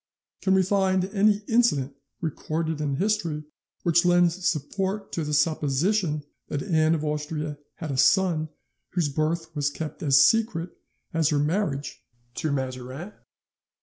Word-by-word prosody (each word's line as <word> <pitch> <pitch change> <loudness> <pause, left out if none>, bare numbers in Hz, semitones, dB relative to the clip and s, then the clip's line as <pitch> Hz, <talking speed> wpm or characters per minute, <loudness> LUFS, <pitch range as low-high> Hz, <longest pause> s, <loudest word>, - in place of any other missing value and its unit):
Can 190 0 +3
we 190 - +4
find 190 -1 +2
any 205 +1 +2
incident 185 - +2 0.3
recorded 160 -1 -2
in 145 -2 -1
history 170 -4 0 0.4
which 170 0 +4
lends 175 0 +3
support 190 +6 -2
to 165 - -2
the 150 - -4
supposition 150 +3 +1 0.2
that 145 -2 -3
Anne 160 -4 +3
of 155 -1 -3
Austria 150 0 -3 0.2
had 160 -3 -5
a 135 - -2
son 160 +1 +3 0.4
whose 170 -5 +1
birth 160 +3 -2
was 145 -1 +1
kept 155 +1 -6
as 140 -2 +5
secret 200 -3 +1 0.4
as 160 -2 +2
her 150 - +1
marriage 150 -1 -1 0.3
to 155 +5 -2
Mazarin? 130 +6 -4
160 Hz, 140 wpm, -26 LUFS, 150-185 Hz, 0.4 s, as